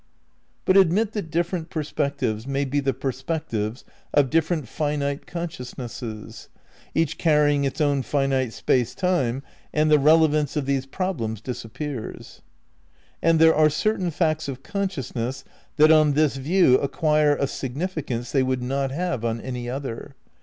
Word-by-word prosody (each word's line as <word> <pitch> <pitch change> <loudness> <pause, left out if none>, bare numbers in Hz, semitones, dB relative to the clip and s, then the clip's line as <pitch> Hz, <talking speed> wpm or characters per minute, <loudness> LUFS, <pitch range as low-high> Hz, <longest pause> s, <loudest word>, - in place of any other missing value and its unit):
But 185 - +4
admit 195 +4 +4
that 205 -7 -4
different 170 0 -1
perspectives 140 -7 -2
may 140 +1 0
be 140 +2 0
the 135 -1 +1
perspectives 130 -3 -3 0.3
of 140 -3 +4
different 160 -3 +1
finite 145 0 -2
consciousnesses, 125 -9 -7 0.5
each 165 0 0
carrying 150 -3 +3
its 135 - -3
own 145 -2 +2
finite 135 -3 0
space 125 +1 0
time,^ 140 -9 0 0.3
and 155 0 +2
the 150 - +6
relevance 150 -1 +4
of 145 - -1
these 135 -1 -1
problems 135 - -3
disappears. 125 +2 -6 0.8
And 165 0 +4
there 160 0 +6
are 155 0 +5
certain 185 +4 0
facts 155 -1 0
of 135 -1 -6
consciousness 135 - -3 0.3
that 155 0 +6
on 155 -2 +5
this 150 -1 +2
view 140 0 +4
acquire 150 +1 +2
h 140 - 0
significance 135 -4 -4
they 135 - +3
would 130 -1 0
not 135 +2 -1
have 160 -3 -2
on 115 0 -1
any 125 -1 -5
other. 135 0 -5
145 Hz, 140 wpm, -24 LUFS, 130-160 Hz, 0.8 s, the